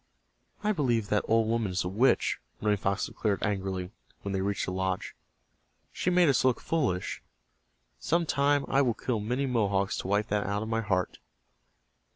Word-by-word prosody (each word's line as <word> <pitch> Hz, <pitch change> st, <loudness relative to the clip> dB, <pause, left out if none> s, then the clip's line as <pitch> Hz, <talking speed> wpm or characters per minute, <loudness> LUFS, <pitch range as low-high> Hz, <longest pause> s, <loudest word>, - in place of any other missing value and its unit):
"I 210 Hz, -, +2 dB
believe 120 Hz, -, 0 dB
that 105 Hz, -1 st, +2 dB
old 115 Hz, -1 st, +3 dB
woman 115 Hz, -3 st, 0 dB
is 90 Hz, -, -1 dB
a -, -, -3 dB
witch," 110 Hz, +9 st, +2 dB, 0.2 s
Running 105 Hz, -1 st, +1 dB
Fox 95 Hz, +1 st, 0 dB
declared, 105 Hz, -3 st, -2 dB
angrily, 95 Hz, -3 st, -2 dB, 0.3 s
when 100 Hz, -, -3 dB
they 95 Hz, -1 st, -1 dB
reached 100 Hz, +1 st, -1 dB
the -, -, -3 dB
lodge. 95 Hz, 0 st, -2 dB, 0.8 s
"She -, -, -1 dB
made 180 Hz, -1 st, +4 dB
us 135 Hz, -3 st, +3 dB
look 130 Hz, -2 st, +3 dB
foolish. 125 Hz, -, -1 dB, 0.8 s
Some 170 Hz, +1 st, +1 dB
time 145 Hz, -1 st, +2 dB
I 135 Hz, -, +3 dB
will 120 Hz, -5 st, +1 dB
kill 120 Hz, -3 st, -2 dB
many 125 Hz, +6 st, -1 dB
Mohawks 100 Hz, -6 st, 0 dB
to -, -, -4 dB
wipe 105 Hz, +2 st, +1 dB
that 105 Hz, -1 st, 0 dB
out 100 Hz, +1 st, -1 dB
of 110 Hz, -, -6 dB
my 115 Hz, 0 st, 0 dB
heart." 95 Hz, -4 st, -1 dB
105 Hz, 180 wpm, -29 LUFS, 95-130 Hz, 0.8 s, made